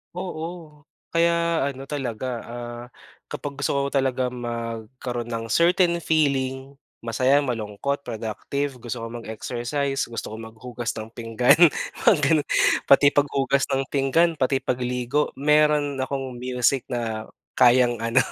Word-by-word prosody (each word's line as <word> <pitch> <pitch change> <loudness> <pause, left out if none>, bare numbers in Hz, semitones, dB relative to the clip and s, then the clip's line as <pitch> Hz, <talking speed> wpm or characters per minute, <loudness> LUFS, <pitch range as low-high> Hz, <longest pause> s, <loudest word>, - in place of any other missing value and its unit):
Oo, 165 -4 -7 0.3
kaya 170 -2 +2
ano 135 -1 -6
talaga, 130 -4 -4 0.2
ah, 120 0 -7 0.4
kapag 145 -1 -6
gusto 140 - 0
ko 140 0 0
talaga 130 -2 0
magkaroon 120 0 -5
ng 115 -1 -4
certain 170 0 +3
feeling 140 -3 0 0.2
masaya, 130 +5 +2
malungkot, 120 +4 -3
productive, 120 +4 -4
gusto 120 -1 -5
ko - - -4
mag-exercise, 125 +5 -3
gusto 115 -2 -5
ko - - -5
maghugas 115 +1 -6
ng 110 +1 -7
pinggan, 115 +5 +3 0.5
mga - - +9
ganun. 150 0 +3 0.4
Pati 140 +1 +7
paghugas 140 -1 +1
ng 135 0 +1
pinggan, 145 +5 +3
pati 135 +1 +2
pagligo 125 +3 -1
meron 150 -1 +3
akong 135 -1 -3
music 125 +1 0
na 115 -3 -3 0.3
kayang 120 -1 +5
ano, 115 +2 -1
130 Hz, 125 wpm, -24 LUFS, 120-145 Hz, 0.5 s, mga